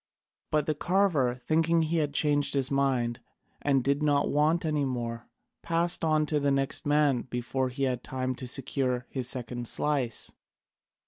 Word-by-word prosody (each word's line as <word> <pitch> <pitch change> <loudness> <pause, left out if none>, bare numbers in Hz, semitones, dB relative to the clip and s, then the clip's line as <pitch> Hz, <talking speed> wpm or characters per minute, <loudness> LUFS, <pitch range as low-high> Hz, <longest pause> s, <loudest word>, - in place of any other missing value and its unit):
But 150 -1 +1
the 155 - +1
carver, 160 -7 +1
thinking 160 +6 +1
he 160 +2 0
had 150 -2 0
changed 145 0 +2
his 135 -1 +1
mind 130 -4 +1 0.4
and 135 -3 +2
did 140 +2 +1
not 145 -1 +2
want 155 +4 +2
any 150 -2 0
more, 120 -3 -4 0.3
passed 170 +1 +1
on 155 -1 +2
to 150 0 0
the 140 0 +1
next 135 +1 0
man 145 -4 +3
before 125 +2 -2
he 135 +2 -4
had 125 -2 -1
time 130 0 -2
to 130 - -6
secure 125 -1 -1
his 130 -2 -1
second 120 -1 -4
slice. 135 -6 -1
140 Hz, 165 wpm, -28 LUFS, 125-150 Hz, 0.4 s, man